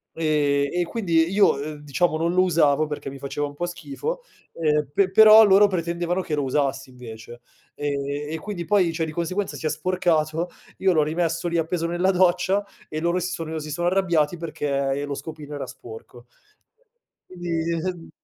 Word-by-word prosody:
Ehm, 145 -3 +1
e 175 0 +1
quindi 170 -6 +1
io, 195 -8 +4
ehm, 150 0 -6
diciamo, 150 +3 0
non 170 +2 0
lo 185 - +4
usavo 155 -4 +3
perché 150 -2 -5
mi 135 - -9
faceva 145 +2 -3
un 145 - -10
po' 175 - -2
schifo, 175 - -5 0.3
ehm, 150 -3 0
pe 195 +2 +3
però 220 +2 +9
loro 200 +1 +6
pretendevano 175 0 -2
che 155 -4 -3
lo 145 - -1
usassi 135 0 -1
invece, 120 -2 -11 0.4
ehm, 145 -1 -2 0.3
e - - -2
quindi 175 -1 -5
poi, 180 -1 +3
cioè, 165 0 -2
di 155 - -7
conseguenza 185 +4 -2
si - - -7
è - - +2
sporcato, 165 -1 0 0.3
io 190 - +3
l'ho 155 -3 +3
rimesso 165 +2 -1
lì 170 - 0
appeso 165 +1 -1
nella 175 +3 +1
doccia 185 +2 +2 0.2
e 155 - -3
loro 170 +2 0
si 180 +1 -2
sono 160 -2 -4
si 150 0 -7
sono 175 +3 -1
arrabbiati 175 -4 +1
perché 145 -4 -2
e 140 +1 -2
lo 145 - -4
scopino 150 0 -8
era 145 - -5
sporco, 120 +1 -12 1.0
quindi 170 0 -3
165 Hz, 180 wpm, -23 LUFS, 150-180 Hz, 1.0 s, però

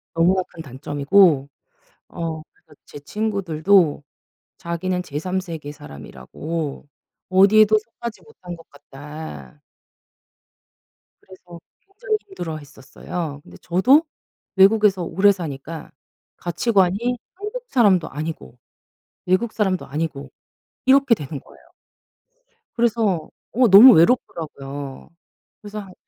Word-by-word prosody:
너무나 180 +3 +3
큰 165 - -11
단점이고 145 +2 +2 0.6
어 165 -2 -5
그러니까 - - -23
제 - - -11
친구들도 185 -3 +1 0.6
자기는 180 +2 -3
제3 180 +5 -3
세계 160 -5 -7
사람이라고 145 - -7 0.4
어디에도 210 +3 +5
속하지 230 +1 -9
못한 180 - -10
것 165 - -18
같다. 145 - -11 1.6
그래서 180 -2 -14 0.2
굉장히 430 +3 -3
힘들어했었어요. 155 - -7
근데 - - -15
저도 250 - +4 0.5
외국에서 195 -1 +4
오래 195 +5 +3
사니까 160 -3 -7 0.5
가치관이 200 +5 0 0.2
한국 425 +5 -6
사람도 200 - +3
아니고 150 - -7 0.7
외국 185 +5 +1
사람도 190 -4 -1
아니고 150 -1 -5 0.6
이렇게 270 -2 +5
되는 145 -6 -7
거예요. - - -21 1.1
그래서 225 -8 0 0.2
어 250 +2 +4
너무 220 +6 +10
외롭더라고요. 145 - -1 0.5
그래서 210 0 -7
한 190 -3 -10
180 Hz, 255 characters per minute, -21 LUFS, 150-210 Hz, 1.6 s, 너무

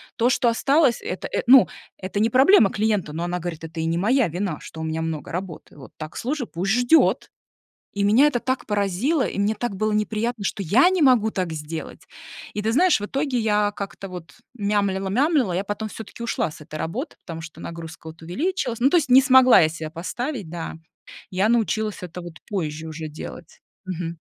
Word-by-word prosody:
То, 235 +2 +2
что 245 -1 +2
осталось, 270 +2 +2
это 180 - -4
это, - - -1
ну, 260 0 +8 0.3
это 195 +1 -4
не 225 +2 +2
проблема 260 - +6
клиента, 205 -7 0
но",- 165 +2 -3
она 175 0 -2
говорит,- 165 -2 -6
"Это 165 0 -7
и 160 - -1
не 165 +1 0
моя 245 +6 +3
вина, 175 -1 -3
что 160 - -9
у - - -3
меня 160 0 -2
много 160 -2 -4
работы. 175 -3 -7
Вот 130 - -12
так, 155 0 -8
слушай, 260 0 -2
пусть 185 +4 -2
ждет". 245 +8 +3 0.6
И 200 - -1
меня 225 +8 +5
это 250 -5 0
так 255 0 -2
поразило, 210 - +1
и - - -4
мне 205 +2 +1
так 240 -4 -3
было 215 +3 0
неприятно, 215 +1 -1
что 200 - -2
я 210 - +4
не 375 -2 0
могу 245 -6 +4
так 185 -4 -2
сделать. 155 +1 -7 0.5
И 210 - -3
ты 220 +2 0
знаешь, 345 +5 +4
в 205 - -4
итоге 275 +1 -1
я 210 -2 +2
как-то 195 0 -6
вот 180 -2 -10 0.2
мямлила, 200 -3 0
мямлила, 260 - +2
я 185 +3 -1
потом 205 +2 -4
все-таки 225 +2 -10
ушла 235 -8 -1
с 155 - -13
этой 150 - -10
работы, 215 - -4
потому 165 -2 -6
что 160 0 -11
нагрузка 165 -1 -8
вот 160 0 -13
увеличилась. 250 - -2
Ну, 255 +3 +4
то 355 - +5
есть 290 -5 0
не 255 +2 +8
смогла 260 -2 +7
я 155 - +4
себя 160 -1 -6
поставить, 215 - -4
да. 165 -1 -6 0.6
Я 190 +4 +1
научилась 220 -2 0
это 180 0 -7
вот 170 -2 -10
позже 160 -5 -3
уже 155 0 -6
делать. 155 +2 -10 0.2
Мгм. 170 -2 -5
205 Hz, 205 wpm, -23 LUFS, 170-245 Hz, 0.6 s, ну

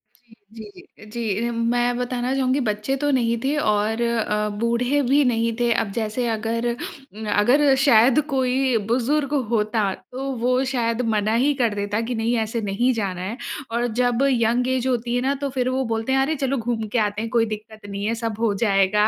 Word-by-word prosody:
जी, 235 -2 -25 0.2
जी, 210 -1 -13
जी, 220 -1 -3
जी। 235 - -1
मैं 240 +1 0
बताना 250 +1 -2
चाहूँगी 265 +1 +1
बच्चे 210 +6 -1
तो 290 +1 0
नहीं 235 -3 +1
थे 285 +3 +1
और 215 -3 +1
अ, 215 -3 0
बूढ़े 245 +5 +1
भी 285 +1 +5
नहीं 230 -2 +1
थे। 240 -1 +2
अब 200 -3 -1
जैसे 225 +2 -2
अगर 225 +2 -1
उम, 235 -2 -8
अगर 270 +7 +4
शायद 240 +1 +5
कोई 260 -1 +1
बुज़ुर्ग 280 +4 +1 0.2
होता 215 -3 +1 0.2
तो 260 +2 -5 0.2
वो 255 +1 +2
शायद 230 -1 0
मना 210 +1 +1
ही 290 - +3
कर 225 -3 +2
देता 205 +1 -1
कि 245 - -1
नहीं 230 +2 0
ऐसे 225 +1 -3
नहीं 240 +6 +2
जाना 195 -5 -3
है। 210 +7 -4 0.3
और 240 +1 0
जब 245 +1 +2
यंग 240 +1 +1
ऐज 255 +1 -2
होती 240 -1 -1
है 245 - +1
ना 270 +2 +1
तो 280 - -1
फिर 255 0 +1
वो 260 +1 0
बोलते 225 +3 -2
हैं 270 - +3
"अरे 310 +4 0
चलो 270 0 -1
घूम 225 -2 -2
के 235 - -2
आते 210 0 -1
हैं 225 - -4
कोई 230 -1 +3
दिक्कत 215 0 -8
नहीं 200 +1 -4
है 230 - 0
सब 225 -1 -3
हो 225 -3 +1
जाएगा" 200 +1 +3
235 Hz, 200 wpm, -22 LUFS, 215-255 Hz, 0.3 s, भी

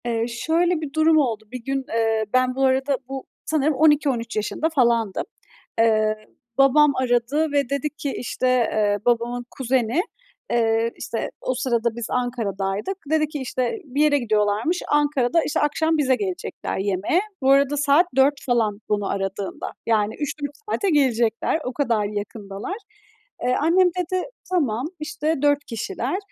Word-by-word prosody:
Eee, 230 -1 0
şöyle 325 +7 0
bir 290 -3 -6
durum 315 0 +4
oldu. 235 -7 +1
Bir 250 -2 -7
gün, 270 +1 -2
ııı 225 -1 +1
ben 255 0 +2
bu 270 0 +2
arada, 265 +1 +2
bu 270 -1 -5 0.2
sanırım 310 -1 +1
12-13 280 -6 +2
yaşında 215 +9 -1
falandım. 235 -6 +2 0.6
Eee, 215 -1 +3 0.4
babam 280 +2 +5
aradı 260 +5 +1
ve 285 -3 +1
dedi 280 +1 -1
ki, 295 -2 -5
işte, 255 +1 -2
eee, 215 -5 +2
babamın 240 0 0
kuzeni, 255 +2 0 0.5
eee, 225 0 +2
işte, 230 - -4
o 255 - -1
sırada 235 -3 0
biz 235 -1 -4
Ankara'daydık, 225 - -2
dedi 310 -1 +3
ki: 300 0 -6
İşte 255 - -2
bir 280 +1 -1
yere 300 -1 +4
gidiyorlarmış. 215 - +1
Ankara'da 295 0 +2
işte - - -1
akşam 315 +2 +1
bize 265 -3 +3
gelecekler 370 +3 -4
yemeğe. 200 - +1 0.2
Bu 265 0 +4
arada 280 +1 +4
saat 290 +4 +4
4 270 +2 +5
falan 225 -5 +1
beni 205 -1 0
aradığında. 195 0 -3 0.2
Yani 220 -1 +1
3-4 290 0 -4
saate 400 -2 0
gelecekler. 240 -3 +2
O 255 - -3
kadar 235 -7 +1
yakındalar. 205 - -5 0.7
Eee, 250 +1 +2
annem 355 +4 +4
dedi, 365 +1 -1 0.3
tamam, 270 -10 0
işte 310 +1 -1
4 290 0 +2
kişiler 350 - -3
255 Hz, 150 wpm, -23 LUFS, 230-295 Hz, 0.7 s, babam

